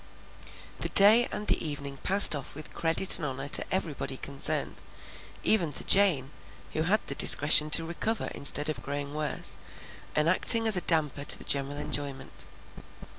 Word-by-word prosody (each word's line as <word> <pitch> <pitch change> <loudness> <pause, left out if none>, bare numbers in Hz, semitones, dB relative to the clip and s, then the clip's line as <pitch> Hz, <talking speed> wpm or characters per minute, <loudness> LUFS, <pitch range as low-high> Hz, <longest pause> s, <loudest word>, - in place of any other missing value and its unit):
The - - -4
day 215 +5 +6
and 210 - -7
the - - -1
evening 140 -3 -8
passed 195 +1 +5
off 140 -1 -10
with 155 +1 -11
credit 165 +3 +3
and 155 - -6
honor 135 +1 -8
to - - +2
everybody 150 -7 -5
concerned, 140 +1 -4 0.6
even 175 -8 -1
to - - -3
Jane, 170 -9 0 0.4
who 155 - -4
had 195 +7 -2
the - - -5
discretion 150 +2 +5
to 165 +2 +3
recover 205 +7 -6
instead 145 +1 +1
of 150 -6 -6
growing 140 +3 -8
worse 150 0 -4 0.6
and 150 +1 -1
acting 225 +6 +3
as 220 - +3
a 180 - -1
damper 150 -4 0
to - - +1
the - - -13
general 140 0 -3
enjoyment. 140 - -6
150 Hz, 165 wpm, -25 LUFS, 140-180 Hz, 0.6 s, day